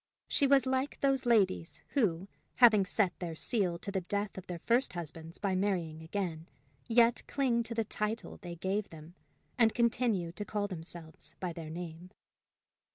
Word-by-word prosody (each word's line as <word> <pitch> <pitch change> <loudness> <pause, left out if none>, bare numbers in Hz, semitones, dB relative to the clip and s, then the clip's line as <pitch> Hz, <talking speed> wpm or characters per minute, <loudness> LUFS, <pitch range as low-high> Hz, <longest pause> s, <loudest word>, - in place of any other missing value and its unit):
She 280 - +3
was 275 -1 +5
like 260 +2 -1
those 270 -2 +2
ladies 195 - +2
who, 195 - +1 0.3
having 215 -6 +6
set 195 -3 +1
their 170 -3 -4
seal 180 -1 0
to 200 +4 -5
the 190 -1 -1
death 205 +3 -2
of 190 0 -8
their 175 - -4
first 235 +8 +1
husbands 165 -1 -7
by 200 -2 -1
marrying 180 -5 -1
again, 165 -1 -3 0.4
yet 235 0 +4
cling 255 -4 +1
to 230 0 -5
the 225 - +1
title 215 +1 -3
they 175 -2 -6
gave 190 +4 -2
them, 160 +1 -12 0.5
and 225 -2 +5
continue 235 -7 +1
to 205 - -5
call 205 0 -2
themselves 165 -3 -7
by 180 -2 -3
their 160 -1 -7
name. 170 +1 -7
195 Hz, 165 wpm, -32 LUFS, 170-230 Hz, 0.5 s, having